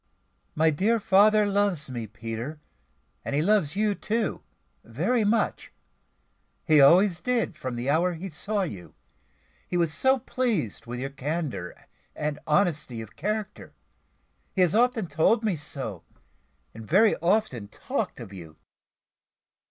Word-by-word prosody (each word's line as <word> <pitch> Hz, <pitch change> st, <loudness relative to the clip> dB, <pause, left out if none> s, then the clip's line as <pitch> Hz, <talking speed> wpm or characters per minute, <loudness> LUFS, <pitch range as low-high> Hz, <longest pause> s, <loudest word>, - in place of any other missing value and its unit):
"My 160 Hz, +1 st, +4 dB
dear 215 Hz, +10 st, +1 dB
father 210 Hz, +2 st, +5 dB
loves 200 Hz, -6 st, 0 dB
me, 120 Hz, -4 st, -5 dB
Peter, 115 Hz, +7 st, -6 dB, 0.6 s
and -, -, -3 dB
he 150 Hz, -, +2 dB
loves 190 Hz, -5 st, +2 dB
you 210 Hz, 0 st, +1 dB
too, 220 Hz, +2 st, -2 dB, 0.4 s
very 180 Hz, -, 0 dB
much 220 Hz, +2 st, 0 dB, 0.9 s
he 155 Hz, -2 st, +5 dB
always 175 Hz, +5 st, +5 dB
did, 230 Hz, -5 st, 0 dB
from 130 Hz, -5 st, -5 dB
the 120 Hz, +2 st, -4 dB
hour 170 Hz, +5 st, +2 dB
he 175 Hz, +4 st, -6 dB
saw 195 Hz, +5 st, -2 dB
you 100 Hz, -, -7 dB, 0.7 s
he 175 Hz, -, -1 dB
was 165 Hz, -3 st, +1 dB
so 265 Hz, -, +3 dB
pleased 225 Hz, -, -2 dB
with 120 Hz, +1 st, -5 dB
your 135 Hz, +2 st, -4 dB
candour 140 Hz, -, -4 dB, 0.4 s
and 150 Hz, -1 st, -3 dB
honesty 150 Hz, -, +1 dB
of 110 Hz, -1 st, -9 dB
character. 210 Hz, +4 st, -4 dB, 0.8 s
He 190 Hz, -, +2 dB
has 180 Hz, -3 st, +3 dB
often 235 Hz, -1 st, +2 dB
told 165 Hz, +8 st, +2 dB
me 210 Hz, -5 st, +1 dB
so, 135 Hz, -, -7 dB, 0.7 s
and 110 Hz, -, -9 dB
very 195 Hz, -, +4 dB
often 170 Hz, -, 0 dB
talked -, -, -4 dB
of 100 Hz, -, -9 dB
you." 80 Hz, -5 st, -11 dB
165 Hz, 135 wpm, -26 LUFS, 135-210 Hz, 0.9 s, father